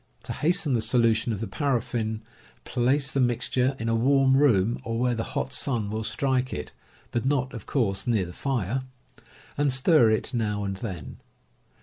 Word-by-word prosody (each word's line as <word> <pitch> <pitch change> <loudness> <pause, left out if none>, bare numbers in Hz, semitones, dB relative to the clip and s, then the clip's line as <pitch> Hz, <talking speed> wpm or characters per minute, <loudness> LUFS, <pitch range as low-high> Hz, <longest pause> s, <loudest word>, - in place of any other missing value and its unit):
To - - -5
hasten 165 -2 +1
the 115 - +2
solution 115 0 +2
of 105 -2 -3
the 115 - -3
paraffin, 115 -6 -2 0.4
place 135 +3 +1
the 135 - -1
mixture 125 +1 +1
in 115 - -4
a 115 - +1
warm 135 +3 +3
room, 120 -6 +3
or 115 0 -3
where 125 +1 +1
the 115 -1 -2
hot 135 - -2
sun 115 -7 -1
will 110 +1 -3
strike 130 +2 -1
it 75 - -5 0.4
(but 120 - -1
not, 135 -1 0
of 115 -5 -8
course, 110 -8 -1
near 110 -6 +2
the 85 - -9
fire) 130 -1 -2 0.8
and 145 -1 +3
stir 130 -1 +4
it 110 +3 0
now 105 -3 -1
and 95 -1 -3
then. 95 - -7
120 Hz, 180 wpm, -26 LUFS, 110-135 Hz, 0.8 s, stir